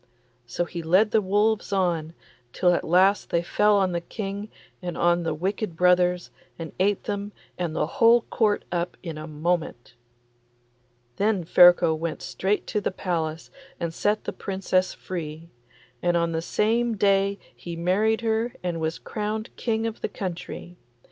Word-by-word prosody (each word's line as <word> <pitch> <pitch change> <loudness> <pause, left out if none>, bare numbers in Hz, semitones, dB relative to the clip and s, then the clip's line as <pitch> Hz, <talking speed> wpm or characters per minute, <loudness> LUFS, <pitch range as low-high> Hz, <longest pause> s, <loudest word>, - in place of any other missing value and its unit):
So 175 +8 -2
he 170 0 -6
led 185 +6 +3
the 220 - +4
wolves 205 +2 +1
on, 170 -4 0 0.4
till 180 -1 +3
at - - 0
last 190 +4 +3
they 170 0 +1
fell 210 +4 +3
on 190 -2 +2
the 170 -1 -2
King 200 +2 -5 0.3
and 175 -2 -5
on 175 0 +3
the 165 -2 -2
wicked 190 +2 -2
brothers, 180 0 +3 0.3
and 165 -2 -6
ate 200 +1 +2
them 205 0 -4 0.2
and 170 -3 -3
the - - +1
whole 235 +1 +4
Court 215 -2 0
up 175 0 -2
in 165 -4 -6
a 155 - -7
moment. 155 -5 -2 1.2
Then 205 -3 +1
Ferko 175 -1 +6
went 160 0 -4
straight 200 +2 -1
to 210 - -2
the - - 0
palace 165 -4 -3 0.3
and 170 -1 -3
set 210 +5 0
the - - -4
Princess 190 -1 0
free, 165 -2 -7 0.5
and 175 -1 +2
on 170 0 +1
the 160 0 -1
same 225 +5 +1
day 200 0 +2 0.2
he 170 -1 -7
married 205 +7 +1
her 225 +1 0
and 170 -2 -2
was 160 +1 -1
crowned 215 +1 -4
King 225 -1 -1
of 225 -1 -4
the - - -2
country. 180 -1 -6
180 Hz, 160 wpm, -25 LUFS, 170-205 Hz, 1.2 s, Ferko